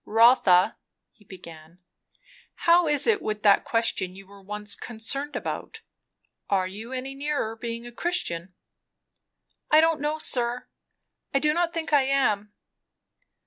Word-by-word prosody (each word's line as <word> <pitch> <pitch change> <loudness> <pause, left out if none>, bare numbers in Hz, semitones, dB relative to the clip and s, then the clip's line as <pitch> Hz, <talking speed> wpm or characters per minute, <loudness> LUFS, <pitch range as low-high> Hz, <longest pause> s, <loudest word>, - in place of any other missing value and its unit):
"Rotha 220 -5 +4 0.2
" - - -59
he 210 - -25
began, 170 -3 -13 0.9
"how 340 0 +5
is 295 -2 +3
it 435 -3 +2
with 215 -1 -4
that 200 -2 +5
question 230 -5 -1
you 195 +1 -12
were 200 +1 -16
once 210 +1 -4
concerned 260 +6 -4
about? 445 - -5 0.7
Are 190 -2 +2
you 210 +6 -8
any 260 +1 -5
nearer 280 -5 -2
being 230 0 -6
a 240 - -9
Christian?" 185 - -3 1.1
"I 305 - +6
don't 320 -2 +2
know, 300 +1 -1
sir. 245 -4 -1 0.7
I - - +6
do 300 +2 +2
not 340 0 0
think 330 -2 -4
I 280 -2 +5
am." 215 -7 +1
235 Hz, 145 wpm, -25 LUFS, 200-295 Hz, 1.1 s, I